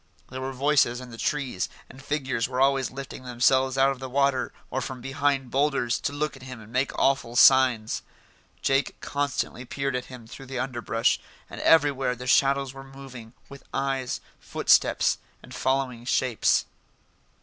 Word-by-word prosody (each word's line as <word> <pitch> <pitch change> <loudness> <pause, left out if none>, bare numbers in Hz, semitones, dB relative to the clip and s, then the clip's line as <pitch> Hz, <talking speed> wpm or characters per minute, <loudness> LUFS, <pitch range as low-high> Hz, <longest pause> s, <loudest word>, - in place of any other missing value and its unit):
There 130 0 -5
were 135 +1 -3
voices 135 -2 +2
in 125 -1 -10
the 115 - -9
trees, 140 -10 -1 0.2
and 135 - -13
figures 135 -4 -2
were 125 0 -3
always 135 -1 +3
lifting 135 0 -8
themselves 130 +2 +2
out 135 +1 +4
of 135 - -6
the 130 0 -6
water, 135 -1 +1 0.2
or 130 - -1
from 130 0 -5
behind 135 0 -1
boulders, 135 -3 +1
to - - -2
look 150 +1 -2
at 130 - -14
him 130 -2 -9
and 110 +1 -14
make 130 +2 +1
awful 135 -3 +1
signs. 125 -4 +5 0.6
Jake 135 +1 +1
constantly 140 -3 -2
peered 135 +1 -3
at 125 - -3
him 125 -3 -11
through 135 +4 -11
the 130 0 -5
underbrush, 120 -3 0 0.3
and - - -7
everywhere 140 -5 +3
the 125 +1 -8
shadows 135 +1 +3
were 135 0 -10
moving, 135 -4 -11
with 140 -1 -12
eyes, 135 -2 -1 0.2
footsteps, - - +2 0.2
and - - -12
following 130 -3 -1
shapes. 125 -3 +2
130 Hz, 165 wpm, -26 LUFS, 125-135 Hz, 0.6 s, signs